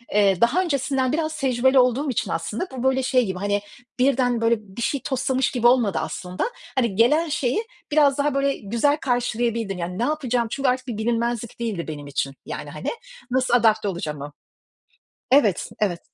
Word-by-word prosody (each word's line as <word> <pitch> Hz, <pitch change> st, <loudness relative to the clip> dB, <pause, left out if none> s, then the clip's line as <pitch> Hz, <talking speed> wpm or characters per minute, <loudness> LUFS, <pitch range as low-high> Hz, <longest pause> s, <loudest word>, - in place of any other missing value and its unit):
ııı, 195 Hz, -3 st, +3 dB
daha 235 Hz, +10 st, +4 dB
öncesinden 270 Hz, -6 st, 0 dB
biraz 310 Hz, 0 st, -1 dB
tecrübeli 260 Hz, 0 st, +3 dB
olduğum 255 Hz, +3 st, +2 dB
için 240 Hz, -, -1 dB
aslında, 210 Hz, -, -3 dB
bu 245 Hz, -, -4 dB
böyle 265 Hz, 0 st, +2 dB
şey 255 Hz, -1 st, +2 dB
gibi, 190 Hz, -2 st, -4 dB
hani 205 Hz, 0 st, 0 dB, 0.4 s
birden 250 Hz, -2 st, +2 dB
böyle 230 Hz, +1 st, +4 dB
bir 210 Hz, +2 st, -10 dB
şey 275 Hz, +2 st, -1 dB
toslamış 265 Hz, 0 st, 0 dB
gibi 240 Hz, -2 st, +3 dB
olmadı 235 Hz, -7 st, +3 dB
aslında. 180 Hz, 0 st, -4 dB, 0.3 s
Hani 235 Hz, -7 st, +1 dB
gelen 300 Hz, +9 st, +3 dB
şeyi, 285 Hz, -, 0 dB, 0.3 s
biraz 290 Hz, -2 st, +4 dB
daha 285 Hz, 0 st, +1 dB
böyle 275 Hz, 0 st, +1 dB
güzel 235 Hz, +8 st, +1 dB
karşılayabildim. 235 Hz, -6 st, -1 dB
Yani 180 Hz, +1 st, -4 dB
ne 235 Hz, -, +1 dB
yapacağım, 250 Hz, -5 st, 0 dB
çünkü 275 Hz, -1 st, +1 dB
artık 255 Hz, +1 st, -1 dB
bir 225 Hz, -3 st, -4 dB
bilinmezlik 235 Hz, 0 st, -2 dB
değildi 215 Hz, -8 st, -3 dB
benim 145 Hz, -2 st, -6 dB
için 135 Hz, 0 st, -2 dB
yani, -, -, -6 dB
hani. -, -, -4 dB, 0.4 s
Nasıl 255 Hz, -1 st, +1 dB
adapte 220 Hz, -3 st, +4 dB
olacağımı 150 Hz, -6 st, -4 dB, 1.0 s
Evet, 240 Hz, -10 st, +3 dB
evet. 185 Hz, -5 st, 0 dB
240 Hz, 170 wpm, -23 LUFS, 210-265 Hz, 1.0 s, daha